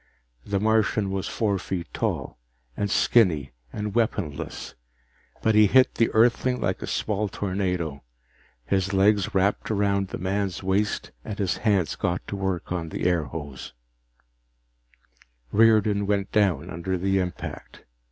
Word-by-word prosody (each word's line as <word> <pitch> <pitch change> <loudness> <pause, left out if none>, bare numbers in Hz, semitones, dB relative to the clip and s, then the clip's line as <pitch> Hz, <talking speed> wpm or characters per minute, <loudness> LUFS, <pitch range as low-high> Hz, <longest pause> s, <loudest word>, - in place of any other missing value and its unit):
The 100 -1 -1
Martian 110 -1 +2
was 95 -1 -2
four 100 -4 0
feet 90 -2 -4
tall, - - -3 0.4
and 100 - -1
skinny 85 - +3 0.2
and 105 -1 -4
weaponless, 105 - -2 0.7
but 110 - +3
he 105 0 +6
hit 130 +5 +5
the 115 - +2
Earthling 125 +2 +3
like - - -1
a - - -5
small 105 0 -1
tornado. 90 -7 -2 0.6
His 95 +3 0
legs 100 0 +3
wrapped 95 +2 +1
around 100 -2 +1
the - - -6
man's 95 0 -2
waist 100 +2 0
and 105 - -6
his 95 -4 0
hands 100 -7 +1
got 90 +1 -2
to - - -3
work 95 -3 -3
on 85 -3 -2
the - - -5
airhose. 75 -5 -2 1.8
Riordan 105 -2 +4
went 100 -1 0
down 90 -6 +1
under 95 +2 -2
the 95 +2 +1
impact. 90 -2 -6
100 Hz, 135 wpm, -25 LUFS, 90-105 Hz, 1.8 s, he